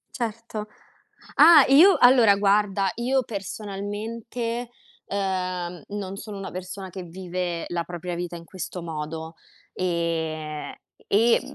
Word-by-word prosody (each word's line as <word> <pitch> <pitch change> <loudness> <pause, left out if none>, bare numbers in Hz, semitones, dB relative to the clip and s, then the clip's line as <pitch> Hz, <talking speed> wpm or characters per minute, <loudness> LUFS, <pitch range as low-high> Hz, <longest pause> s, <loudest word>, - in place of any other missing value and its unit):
Certo. 225 -2 -4 0.7
Ah, 325 -5 +9
io 330 +9 +8
allora 245 -5 +7
guarda, 200 -1 +2
io 255 +2 +1
personalmente, 220 +3 -5 0.4
uhm, 185 -3 -2
non 200 -1 -5
sono 205 -1 -7
una 195 - -6
persona 185 +1 -7
che 190 - -6
vive 175 -1 -4
la 175 -1 -1
propria 175 +1 -6
vita 175 0 -4
in 170 0 -9
questo 180 0 -6
modo. 160 0 -5 0.4
Ehm, 160 -3 -2 0.4
e 230 +4 +4
195 Hz, 115 wpm, -25 LUFS, 175-220 Hz, 0.7 s, Ah